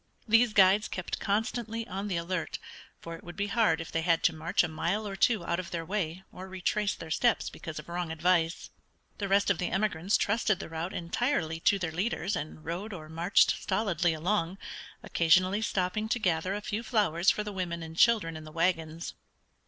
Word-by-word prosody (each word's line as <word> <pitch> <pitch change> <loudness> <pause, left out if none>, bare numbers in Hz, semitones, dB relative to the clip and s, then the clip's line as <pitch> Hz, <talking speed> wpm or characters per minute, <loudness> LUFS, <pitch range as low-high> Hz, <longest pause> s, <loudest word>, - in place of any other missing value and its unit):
These 230 0 +4
guides 200 +1 +5
kept 180 - -4
constantly 225 +2 -2
on 195 +2 -4
the 185 -4 -1
alert, 170 0 -3 0.4
for 165 0 -7
it - - -13
would 175 - -9
be 200 - -1
hard 220 +2 +2
if 165 - -6
they 165 - 0
had 165 0 +2
to 165 - +4
march 165 +4 +1
a - - 0
mile 175 +7 -2
or 195 - -5
two 205 -1 +2
out 170 +1 0
of 185 - -5
their 165 -1 -4
way 185 -1 -3
or 185 +1 -9
retrace 190 +2 -1
their 160 - -9
steps 235 +7 +2
because 160 -1 -8
of 150 - -7
wrong 175 -1 -3
advice. 170 0 +1 0.5
The 200 - -1
rest 200 +1 +3
of 185 - -1
the 180 - -1
emigrants 190 -1 +1
trusted 210 -1 +1
the 185 - -7
route 165 +3 -4
entirely 170 - -1
to 200 - +3
their 170 -4 -3
leaders 190 +2 -1
and 155 +1 -6
rode 185 +7 -4
or 155 -4 -8
marched 170 +4 +3
stolidly 185 -4 +1
along, 180 +2 -1 0.5
occasionally 185 +5 +3
stopping 215 0 -1
to 245 - +1
gather 185 -2 0
a 205 - -4
few 210 +2 -3
flowers 205 -7 +2
for 210 - +1
the 210 -1 -6
women 170 -3 -3
and 160 0 -8
children 205 -5 +4
in 155 - -7
the 155 - -10
wagons. 165 -1 -1
185 Hz, 200 wpm, -29 LUFS, 165-205 Hz, 0.5 s, guides